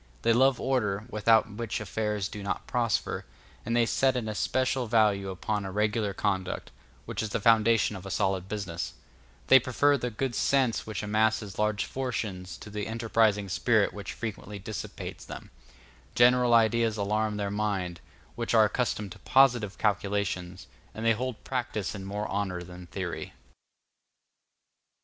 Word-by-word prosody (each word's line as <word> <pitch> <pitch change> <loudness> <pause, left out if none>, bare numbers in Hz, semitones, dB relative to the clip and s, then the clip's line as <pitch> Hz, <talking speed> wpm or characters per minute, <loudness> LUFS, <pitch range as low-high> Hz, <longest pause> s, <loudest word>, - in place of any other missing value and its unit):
They 115 - +4
love 130 +2 +4
order, 105 -6 0
without 110 +1 +4
which 115 +1 -3
affairs 105 -1 -2
do 105 - -8
not 100 - -3
prosper; 115 -5 -1 0.4
and 115 +2 -1
they 120 -1 +4
set 130 +2 +2
an 115 -3 -3
especial 130 +4 0
value 105 -3 +3
upon 105 +3 -2
a 95 - -5
regular 105 +1 0
conduct, 95 -1 -2 0.3
which - - -3
is 110 - -3
the - - -1
foundation 115 0 +4
of 95 - -8
a 95 - -7
solid 95 0 0
business; 95 -6 -4 0.5
they 135 - +8
prefer 140 +3 +2
the 125 - -2
good 120 +3 -2
sense 130 -3 +1
which 110 -1 -4
amasses 105 -1 0
large 105 0 +1
fortunes 105 -9 -4
to 105 - -11
that 105 -1 -3
enterprising 110 -3 +1
spirit 110 +3 +2
which 100 -1 -6
frequently 105 -2 -6
dissipates 105 +2 -7
them; - - -9 0.6
general 125 0 +5
ideas 115 -1 +3
alarm 105 +1 0
their 100 -1 -2
minds, 95 -4 -2 0.3
which 120 0 -1
are 110 -1 +7
accustomed 105 -3 -1
to - - -10
positive 120 -7 +3
calculations, 100 -3 -1 0.3
and 110 +2 -4
they 115 - +5
hold 125 +1 -4
practice 120 -7 -3
in 100 -2 -7
more 105 +2 -3
honor 95 -3 -2
than 90 0 -11
theory. - - -5
105 Hz, 155 wpm, -28 LUFS, 100-115 Hz, 0.6 s, they